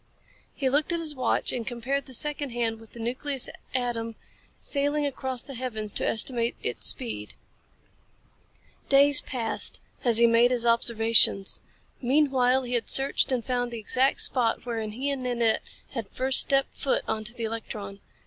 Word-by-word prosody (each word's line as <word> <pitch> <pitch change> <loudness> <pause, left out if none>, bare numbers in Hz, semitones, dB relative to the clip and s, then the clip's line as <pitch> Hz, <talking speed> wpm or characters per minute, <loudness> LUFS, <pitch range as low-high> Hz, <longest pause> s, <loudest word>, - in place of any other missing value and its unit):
He 275 - -1
looked 290 +5 +1
at 340 - -1
his 315 -2 0
watch 255 -4 -1
and 240 -3 -5
compared 265 +3 -3
the 260 - -4
second 295 +1 0
hand 230 -2 -2
with 225 -1 -17
the 235 - -10
nucleus 255 +3 -3 0.3
atom 230 -3 -2 0.4
sailing 290 +1 -1
across 260 -3 -3
the 275 - -9
heavens 225 -4 -4
to - - -1
estimate 235 +1 +1
its 125 - +1
speed. 105 -2 -1 1.5
Days 280 0 +6
passed 235 -4 -1 0.2
as 235 -4 +5
he 235 - +7
made 235 +1 +4
his 245 -2 +3
observations. 230 -4 +4 0.4
Meanwhile 265 -1 +2
he 245 0 -5
had 240 - -1
searched 270 0 +1
and 245 -3 -1
found 245 -2 -1
the 235 - -5
exact 260 +5 +1
spot 235 -2 0
wherein 225 -3 -4
he 270 +5 -2
and 275 -2 -4
Nanette 240 -3 +1 0.3
had 230 -6 -6
first 260 0 +2
stepped 275 0 +2
foot 275 - -1
onto 220 +2 -2
the 235 - -6
electron. 215 -3 -6
245 Hz, 160 wpm, -26 LUFS, 230-270 Hz, 1.5 s, he